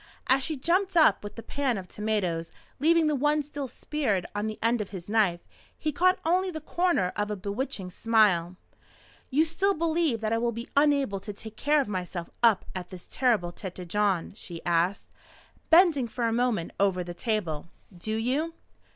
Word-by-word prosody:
As 265 +1 +3
she 310 0 -1
jumped 355 +6 +1
up 265 -13 +5
with 205 0 -7
the 230 - -8
pan 270 -5 -1
of 185 -1 -7
potatoes, 185 -6 -2 0.3
leaving 330 +3 +4
the 305 - +2
one 295 +2 +2
still 285 -1 -5
speared 245 -10 -1
on 205 +1 -2
the 215 - -4
end 230 0 +1
of 205 - -5
his 180 -3 -8
knife, 205 -5 +2 0.4
he 310 - -1
caught 365 +5 +3
only 365 +3 +2
the 315 -3 -5
corner 315 - 0
of 210 0 -1
a 210 - -2
bewitching 200 0 -4
smile. 195 -5 +2 0.7
"You 300 +4 +3
still 385 +5 +1
believe 320 -6 +1
that 220 0 0
I 230 - +2
will 235 0 0
be 235 +2 -6
unable 280 -8 +3
to 205 +2 -7
take 220 +2 -10
care 295 +6 +2
of 270 - -4
myself 180 -3 -4
up 225 -5 +4
at 180 -1 -6
this 185 -2 -9
terrible 220 -9 +1
Tête 180 -2 -7
Jaune?" 200 -2 0
she 175 -6 -9
asked, 175 +3 +1 0.6
bending 325 -7 +5
for 235 +1 -2
a 225 - +1
moment 235 -7 0
over 190 -2 +2
the 175 0 -7
table. 175 -6 -2 0.3
"Do 215 +5 -3
you?" 275 +9 -1
225 Hz, 185 wpm, -27 LUFS, 190-295 Hz, 0.7 s, up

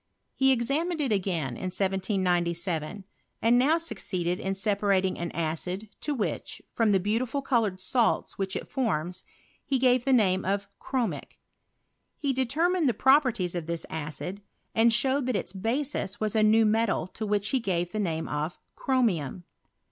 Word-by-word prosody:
He 265 0 +4
examined 290 +8 0
it 275 -5 0
again 180 -8 0
m - - -6
1797. 185 -2 -1 0.4
and 235 +2 +4
now 300 +6 +4
succeeded 185 - -3
in 195 - -2
acpBrating 195 -1 +1
an 170 0 -2
acid 180 +5 -3
to 295 - -2
which, 220 - -3
from 225 -3 +2
tbe 190 -2 +2 0.2
beautifol 255 +3 -3
coloured 220 -8 +1
salts 230 +4 +1
which 190 -1 -3
it - - -4
forms, 185 - -2 0.4
he 270 - 0
gave 250 -1 +3
the 270 - +1
name 190 -7 +3
of 200 +1 -1
chromic. 255 -4 -3 0.8
He 280 -2 0
determined 310 +6 +2
the 235 - -1
properties 250 - +3
of 170 -3 -4
this 170 -1 -3
acid, 160 +5 -5 0.3
Rnd 230 +1 +5
showed 265 +3 +3
that 255 - 0
its 180 -2 -3
basis 225 0 -2
was 215 0 -1
a 220 - +4
new 220 +1 +5
metal 215 -5 +1
to 200 +4 -8
which 205 0 +1
he 265 - +2
ga»e 185 -7 0
the 195 +5 -5
name 165 -5 -1
of 150 +3 -3 0.2
ckrwaiam. 190 - 0
205 Hz, 160 wpm, -27 LUFS, 180-250 Hz, 0.8 s, Rnd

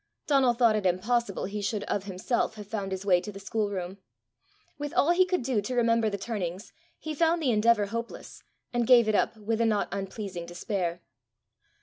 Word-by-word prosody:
Donal 270 -4 +3
thought 230 -2 +4
it 210 - -1
impossible 205 +4 0
he 205 +2 -4
should 205 0 -2
of 200 -1 -2
himself 200 +4 -1
have 210 -1 -8
found 200 -2 -4
his 190 +1 -4
way 180 -3 +4
to 210 - -7
the 195 - -10
schoolroom. 200 -2 -3 0.8
With 290 0 -5
all 320 - +4
he 370 +1 +4
could 365 -7 0
do 240 -4 0
to 250 +5 -4
remember 230 -2 +3
the 200 - -3
turnings, 195 -3 -5 0.2
he 315 - -5
found 330 +2 +2
the 280 -6 +1
endeavour 215 -1 +3
hopeless, 230 +3 -6 0.3
and 240 -1 0
gave 240 -3 +7
it 215 - +2
up 215 - +1
with 220 +2 -1
a - - +3
not 210 -2 +1
unpleasing 195 -3 -5
despair. 175 -1 -3
215 Hz, 195 wpm, -28 LUFS, 195-240 Hz, 0.8 s, gave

